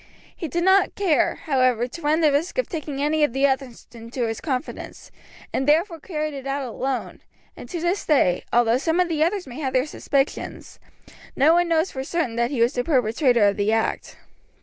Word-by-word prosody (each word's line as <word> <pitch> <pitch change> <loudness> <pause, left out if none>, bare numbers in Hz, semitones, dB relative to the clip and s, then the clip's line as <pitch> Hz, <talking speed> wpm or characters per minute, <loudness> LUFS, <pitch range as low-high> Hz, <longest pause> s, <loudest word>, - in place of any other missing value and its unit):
He 330 - -5
did 340 +4 -2
not 380 +1 +4
care, 370 -7 +2
however, 255 -5 +2
to 335 +7 -10
run 310 +2 +1
the 305 -2 +4
risk 300 - -1
of - - 0
taking 295 -4 -4
any 305 +1 +1
of 295 - +1
the 270 +1 +2
others 265 -3 -2
into 235 +2 -6
his 225 -1 -4
confidence, 275 0 -5 0.4
and 265 - -1
therefore 330 +3 +2
carried 305 -2 -4
it 275 -1 -7
out 275 -1 -2
alone, 255 +2 -4 0.3
and - - -11
to 350 - -4
this 350 +4 -1
day, 185 - +2
although 240 0 +3
some 325 +4 0
of 360 -1 +2
the 310 -2 +1
others 360 +3 -1
may 255 +2 -9
have 265 -4 -2
their 255 +1 +2
suspicions, 280 -2 -3 0.6
no 295 +4 +5
one 350 0 +3
knows 330 +1 +1
for 265 - -5
certain 285 -5 -2
that 235 0 +1
he 260 -4 -2
was 235 +4 +3
the 245 - -1
perpetrator 245 -4 +2
of 200 - 0
the 205 +1 +1
act. 225 0 -1
280 Hz, 205 wpm, -23 LUFS, 250-325 Hz, 0.6 s, no